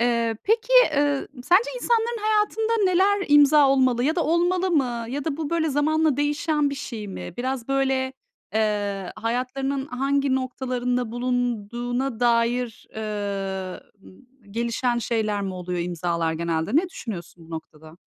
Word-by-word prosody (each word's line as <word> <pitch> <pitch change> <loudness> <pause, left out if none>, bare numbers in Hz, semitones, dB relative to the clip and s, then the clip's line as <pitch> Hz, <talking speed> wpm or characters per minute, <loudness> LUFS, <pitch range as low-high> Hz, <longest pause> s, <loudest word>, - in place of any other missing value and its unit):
Eee, 235 -2 +1
peki, 460 +3 +1
eee, 290 - +1 0.2
sence 420 +8 +4
insanların 470 -1 +1
hayatında 435 +1 +1
neler 385 +2 +3
imza 290 -1 +6
olmalı 255 -2 +3
ya 315 +4 +1
da 335 - +1
olmalı 355 +3 +2
mı 245 -7 0
ya 275 +2 -4
da 305 -3 -2
bu 310 -3 -4
böyle 330 -2 +1
zamanla 305 0 +2
değişen 295 0 +1
bir - - -3
şey 220 -6 -6
mi? 90 - -7
Biraz 255 0 -3
böyle, 265 -1 +1 0.4
eee, 205 -3 -1
hayatlarının 255 +4 -2
hangi 275 +1 0
noktalarında 250 -2 -2
bulunduğuna 245 0 -2
dair, 240 0 +1
eee, 200 -3 -3 0.7
gelişen 235 +2 0
şeyler 215 -3 -1
mi 190 -1 -3
oluyor 180 0 -4
imzalar 170 -1 -1
genelde? 165 - -1
Ne 350 +3 +3
düşünüyorsun 175 - -8
bu - - -16
noktada? 160 0 -9
250 Hz, 135 wpm, -24 LUFS, 215-295 Hz, 0.7 s, imza